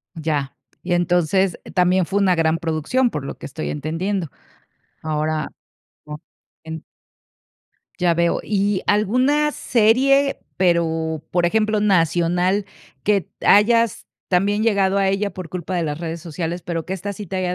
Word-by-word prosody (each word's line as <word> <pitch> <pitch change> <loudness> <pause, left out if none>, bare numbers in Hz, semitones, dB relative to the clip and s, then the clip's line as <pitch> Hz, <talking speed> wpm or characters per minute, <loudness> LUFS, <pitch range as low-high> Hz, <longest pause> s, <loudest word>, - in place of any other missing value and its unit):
Ya. 150 -4 -2 0.3
Y 180 - -3
entonces, 175 +1 +1 0.2
también 180 0 +3
fue 200 +3 0
una 190 -2 +3
gran 165 -1 +1
producción, 165 - 0
por 150 -7 -5
lo - - -6
que - - -9
estoy 150 +3 -5
entendiendo. 165 +5 -2 0.7
Ahora, 155 0 -2 0.6
o 150 0 -7 0.5
en. 160 0 -7 1.2
Ya 175 -1 +2
veo, 170 0 +1
¿y 200 -2 0
alguna 255 +9 +2
serie, 270 +5 +3 0.2
pero, 165 -3 +1
por 175 0 +1
ejemplo, 215 +2 +1
nacional, 180 0 +2 0.4
que 205 -2 +2
t - - -10
hayas 230 +1 +4 0.2
también 200 +3 +1
llegado 200 -3 +2
a 195 -1 +2
ella 200 +1 0
por 180 -2 -8
culpa 180 0 -4
de 175 - 0
las 150 -2 -3
redes 165 0 -4
sociales, 170 +1 -4
pero 165 -2 -4
que 190 - -3
esta 200 +2 -5
sí 205 +1 -8
te 190 - -5
haya 180 -1 -1
180 Hz, 150 wpm, -21 LUFS, 165-205 Hz, 1.2 s, hayas